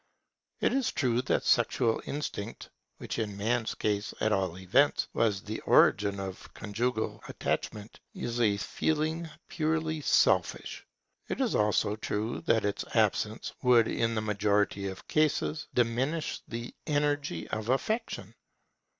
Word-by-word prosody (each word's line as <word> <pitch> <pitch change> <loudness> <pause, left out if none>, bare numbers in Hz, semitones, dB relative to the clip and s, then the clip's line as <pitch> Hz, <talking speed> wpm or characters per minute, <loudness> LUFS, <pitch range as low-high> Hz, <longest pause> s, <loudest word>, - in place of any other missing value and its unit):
It - - +2
is 270 -2 +1
true 125 -2 +1
that - - 0
sexual 115 -1 +2
instinct, 115 -7 -5 0.3
which, - - -5
in 105 -3 -3
man's 115 +2 0
case 105 -1 -1
at 110 - +1
all 95 -4 0
events, 105 +11 +3
was 105 -4 +1
the - - -4
origin 100 -1 +4
of 95 -1 -7
conjugal 110 +2 -2
attachment, 105 +1 -3 0.2
is 120 0 -2
a 105 -3 +3
feeling 155 - -1 0.2
purely 160 -1 -1
selfish. - - +2 0.4
It - - -3
is 255 -5 +1
also 105 0 +2
true 110 +1 -3
that 110 -2 +3
its 100 - -1
absence - - +1
would 120 -3 +5
in 115 0 0
the 110 - 0
majority 105 -1 +1
of 95 -1 -8
cases, 155 0 +1
diminish 130 +7 0
the 115 +1 -6
energy 145 - 0
of 110 +1 -3
affection. 220 - -1
115 Hz, 135 wpm, -30 LUFS, 105-145 Hz, 0.4 s, would